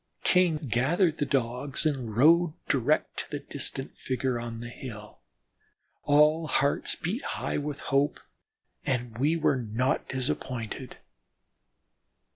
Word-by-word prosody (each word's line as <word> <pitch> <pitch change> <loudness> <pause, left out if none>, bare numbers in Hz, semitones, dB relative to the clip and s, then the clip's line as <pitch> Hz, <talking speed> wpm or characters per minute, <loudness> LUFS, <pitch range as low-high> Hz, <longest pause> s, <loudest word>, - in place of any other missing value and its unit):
King 180 -3 +4
gathered 150 - +1
the 145 - 0
Dogs 130 +2 -1
and 125 -8 -1
rode 165 +4 +5
direct 140 +3 +1
to - - -4
the 145 - -3
distant 140 -1 -4
figure 130 -1 -1
on 115 -1 -5
the 120 0 -6
hill. 110 -4 -9 0.9
All 150 +2 +4
hearts 140 -1 +1
beat 205 - -3
high - - -2
with 145 0 -4
hope, 140 +1 +2 0.6
and 125 -3 -2
we 150 +5 +3
were 155 -4 +2
not 120 +4 -1
disappointed. 125 -2 -4
135 Hz, 120 wpm, -28 LUFS, 125-150 Hz, 0.9 s, rode